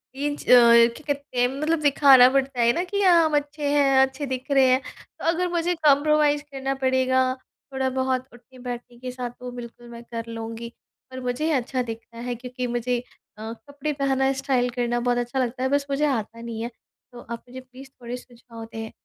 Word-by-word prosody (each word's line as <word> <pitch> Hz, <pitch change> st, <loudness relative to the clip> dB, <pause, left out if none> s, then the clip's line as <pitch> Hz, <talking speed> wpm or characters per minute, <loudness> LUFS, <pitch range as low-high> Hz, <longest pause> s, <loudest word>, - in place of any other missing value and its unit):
Inch 290 Hz, +1 st, -3 dB
अ, -, -, -21 dB
क्या 235 Hz, +1 st, +6 dB
कहते 280 Hz, -3 st, -7 dB
हैं 245 Hz, -, +4 dB
मतलब 305 Hz, +5 st, -1 dB
दिखाना 275 Hz, -3 st, +7 dB
पड़ता 270 Hz, -2 st, 0 dB
है 235 Hz, 0 st, +5 dB
ना 345 Hz, -, -1 dB
कि 400 Hz, +2 st, -2 dB
हाँ, 350 Hz, -4 st, +6 dB
हम 310 Hz, -1 st, +1 dB
अच्छे 290 Hz, 0 st, -2 dB
हैं, 280 Hz, -2 st, +3 dB
अच्छे 265 Hz, +2 st, 0 dB
दिख 260 Hz, +1 st, -5 dB
रहे 270 Hz, -1 st, +5 dB
हैं। 255 Hz, +1 st, +3 dB, 0.4 s
तो -, -, -6 dB
अगर 350 Hz, +2 st, +1 dB
मुझे 345 Hz, 0 st, 0 dB
कॉम्प्रोमाइज़ 295 Hz, 0 st, +4 dB
करना 270 Hz, 0 st, -2 dB
पड़ेगा 260 Hz, 0 st, +3 dB, 0.5 s
थोड़ा 265 Hz, 0 st, 0 dB
बहुत 260 Hz, 0 st, -1 dB
उठने-बैठने 245 Hz, -1 st, -9 dB
के 255 Hz, 0 st, -6 dB
साथ 250 Hz, -1 st, -5 dB
तो 250 Hz, 0 st, -7 dB
बिल्कुल 240 Hz, 0 st, -10 dB
मैं 235 Hz, 0 st, -10 dB
कर 230 Hz, 0 st, -4 dB
लूँगी। 230 Hz, +1 st, -6 dB, 0.4 s
पर 260 Hz, -, -7 dB
मुझे 250 Hz, +6 st, -1 dB
अच्छा 255 Hz, -1 st, -1 dB
दिखना 230 Hz, 0 st, -9 dB
है 245 Hz, -, -2 dB
क्योंकि 250 Hz, +1 st, -5 dB
मुझे 240 Hz, 0 st, -1 dB, 0.4 s
अ, 220 Hz, +1 st, -6 dB
कपड़े 285 Hz, +4 st, -6 dB
पहनना, 270 Hz, -1 st, +1 dB
स्टाइल 265 Hz, -2 st, 0 dB
करना 240 Hz, 0 st, -1 dB
बहुत 245 Hz, 0 st, 0 dB
अच्छा 245 Hz, +2 st, -2 dB
लगता 255 Hz, 0 st, -2 dB
है 260 Hz, -, +1 dB
बस 285 Hz, 0 st, +1 dB
मुझे 280 Hz, +2 st, +1 dB
आता 230 Hz, -4 st, -3 dB
नहीं 230 Hz, -1 st, -6 dB
है। 235 Hz, -, -3 dB, 0.4 s
तो 245 Hz, -, -11 dB
आप 235 Hz, 0 st, -6 dB
मुझे 255 Hz, -, -8 dB
प्लीज़ 260 Hz, +1 st, -14 dB
थोड़े 240 Hz, +1 st, -5 dB
सुझाव 235 Hz, -2 st, -12 dB
दें। 225 Hz, 0 st, -6 dB
255 Hz, 200 wpm, -24 LUFS, 240-280 Hz, 0.5 s, दिखाना